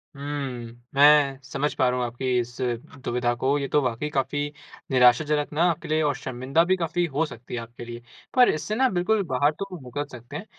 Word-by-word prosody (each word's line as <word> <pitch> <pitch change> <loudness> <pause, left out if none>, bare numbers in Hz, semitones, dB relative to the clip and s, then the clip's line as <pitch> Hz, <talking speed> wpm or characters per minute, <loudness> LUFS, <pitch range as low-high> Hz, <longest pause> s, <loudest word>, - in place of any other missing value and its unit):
हम्म, 135 -5 -5 0.2
मैं 145 -1 +6
समझ 140 +2 -2
पा 130 - +3
रहा 125 - -1
हूँ, 125 - 0
आपकी 125 +1 -1
इस 120 0 -4
दुविधा 120 0 -2
को 140 +2 +2
ये 140 - -2
तो 150 - +5
वाक़ई 125 +4 -2
काफ़ी 140 +1 -1 0.5
निराशाजनक 145 +4 +4
ना 160 - +2
आपके 160 - -6
लिए 155 +1 +1
और 145 -3 +1
शर्मिंदा 130 +4 0
भी 185 - +3
काफ़ी 175 0 0
हो 155 0 0
सकती 125 -5 -10
है 120 - -1
आपके 120 +1 -10
लिए। 120 0 -8 0.3
पर 250 -1 +7
इससे 180 +7 -1
ना 260 +3 +4
बिल्कुल 200 +3 +1
बाहर 140 +2 +2
तो 195 - -3 0.2
निकल 130 +4 -4
सकते 120 +3 -10
हैं, - - -8
135 Hz, 205 wpm, -25 LUFS, 125-150 Hz, 0.5 s, पर